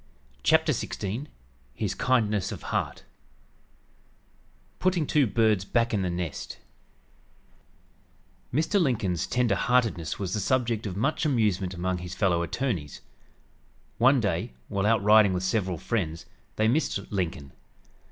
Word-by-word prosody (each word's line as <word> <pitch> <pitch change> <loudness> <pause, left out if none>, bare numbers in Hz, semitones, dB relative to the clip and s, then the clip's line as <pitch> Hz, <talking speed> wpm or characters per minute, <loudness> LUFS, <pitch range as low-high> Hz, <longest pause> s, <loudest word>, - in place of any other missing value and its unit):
CHAPTER - - +4
XVI 110 +9 -3 0.5
HIS - - -2
KINDNESS 110 -6 +1
OF - - -7
HEART - - -2 1.8
PUTTING 180 -4 +1
TWO 150 - +1
YOUNG - - -7
BIRDS 110 -2 +2
BACK 115 +2 +1
IN 105 - +1
THE 90 - -1
NEST 85 -4 -4 1.9
Mr. 160 - +2
Lincoln's 110 - 0
tender 125 -4 +1
heartedness 110 - +1
was 95 -3 -3
the 105 - 0
subject 115 0 0
of 95 -1 -5
much 135 +11 0
amusement 105 - +1
among 90 +1 -2
his 90 0 -7
fellow 90 -4 +2
attorneys. 85 - -3 1.0
One 130 +3 +5
day, 90 - -1 0.2
while 100 0 0
out 110 -2 +3
riding 105 -2 +6
with 90 0 -2
several 95 -2 0
friends, 85 -4 -2 0.3
they 110 - +2
missed 120 -5 0
Lincoln. 85 -8 -3
105 Hz, 130 wpm, -27 LUFS, 90-120 Hz, 1.9 s, riding